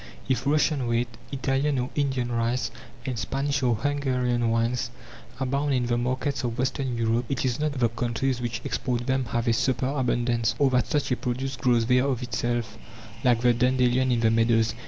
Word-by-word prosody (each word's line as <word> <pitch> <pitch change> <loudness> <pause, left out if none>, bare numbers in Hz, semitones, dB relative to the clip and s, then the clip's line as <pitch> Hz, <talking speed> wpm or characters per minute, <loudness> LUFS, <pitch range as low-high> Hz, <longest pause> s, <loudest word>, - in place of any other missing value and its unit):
If 130 0 0
Russian 145 -3 +2
wheat, 120 +1 +1 0.2
Italian 135 +1 0
or 125 +1 -2
Indian 130 -4 -1
rice, 115 0 0 0.3
and 125 -4 -3
Spanish 135 +6 -1
or 120 -3 +2
Hungarian 125 -2 0
wines 115 +1 0 0.5
abound 140 +2 0
in 125 -1 +1
the 120 0 +1
markets 130 +3 -1
of 120 -2 -2
western 130 -1 -1
Europe, 115 +1 +1
it 135 -1 -1
is 125 0 0
not 150 -1 0
that - - -7
the 120 -2 +3
countries 120 +2 -1
which 120 -1 -3
export 120 -2 -2
them 130 0 0
have 120 +1 -2
a 115 - +4
superabundance, 120 -3 0
or 135 0 +3
that 125 -2 +2
such 145 -4 0
a - - +3
produce 130 +2 -3
grows 120 -3 +2
there 125 +2 +3
of 130 -2 -1
itself, 120 -2 -2 0.4
like 120 -2 +3
the 120 0 +4
dandelion 125 +1 +2
in 120 -1 +1
the 110 -1 +4
meadows. 115 -1 +3
125 Hz, 185 wpm, -26 LUFS, 120-135 Hz, 0.5 s, a